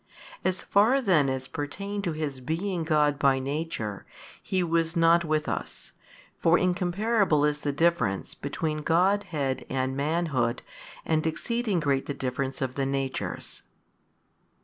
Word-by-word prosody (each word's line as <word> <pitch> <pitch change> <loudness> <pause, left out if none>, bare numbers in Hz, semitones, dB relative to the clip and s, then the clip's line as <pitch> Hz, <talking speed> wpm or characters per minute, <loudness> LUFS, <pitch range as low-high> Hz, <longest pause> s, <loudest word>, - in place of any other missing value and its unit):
As 185 -1 -1
far 220 +7 +4
then 175 - +3
as 130 0 -3
pertained 200 +7 -4
to 170 - -1
His 150 -4 -3
being 170 +6 -2
God 150 -2 +2
by 135 -2 +4
Nature, 130 -7 -3 0.4
He 185 -2 0
was 165 0 0
not 170 0 +5
with 155 -1 0
us; - - -5 0.5
for 165 +1 +4
incomparable 180 -2 +2
is 150 0 0
the 145 - -1
difference 140 - +1
between 155 +2 -3
Godhead 165 -5 +1
and 130 0 -1
manhood 140 -5 0 0.4
and 160 0 +1
exceeding 220 +4 -1
great 140 -3 0
the 140 - -3
difference 135 +1 -2
of 130 -1 -2
the 135 0 -1
natures. 135 -1 -3
155 Hz, 135 wpm, -27 LUFS, 135-175 Hz, 0.5 s, not